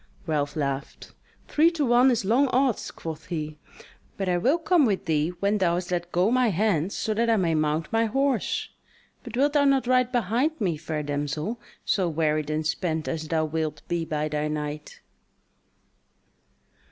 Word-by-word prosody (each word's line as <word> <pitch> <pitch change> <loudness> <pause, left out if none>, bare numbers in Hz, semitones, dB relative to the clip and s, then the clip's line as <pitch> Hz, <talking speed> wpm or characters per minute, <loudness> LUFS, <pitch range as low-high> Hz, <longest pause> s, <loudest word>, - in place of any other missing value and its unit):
Ralph 145 -3 -1
laughed: 140 -2 -4 0.3
"Three 315 +3 +4
to 305 -4 0
one 245 +2 +5
is 235 -6 +1
long 250 +7 +3
odds," 255 -2 +1
quoth 160 -1 -8
he, 155 -3 -4 0.6
"but 195 - -2
I 180 - +2
will 265 - +3
come 345 -1 +3
with 205 -7 0
thee 155 0 +1
when 205 +1 +2
thou 175 -2 +2
hast 180 0 -4
let 175 0 -2
go 180 +5 +2
my 255 0 +3
hands 195 -3 0
so 220 - -1
that 230 +2 +1
I 225 - +4
may 170 -4 +1
mount 155 +2 0
my 225 0 +3
horse. 275 - 0 0.5
But 240 -1 -7
wilt 285 +2 +3
thou 290 -1 +4
not 275 -2 +3
ride 255 0 +2
behind 245 - 0
me, 185 -7 0
fair 155 0 -4
damsel; 145 +9 -3 0.3
so 185 -4 +1
wearied 155 -1 0
and 155 0 -1
spent 160 0 -1
as 160 -1 -3
thou 160 0 +1
wilt 155 0 -3
be 170 -1 -1
by 155 -1 -2
thy 150 0 -1
night." 150 0 -5
180 Hz, 175 wpm, -26 LUFS, 155-240 Hz, 0.6 s, one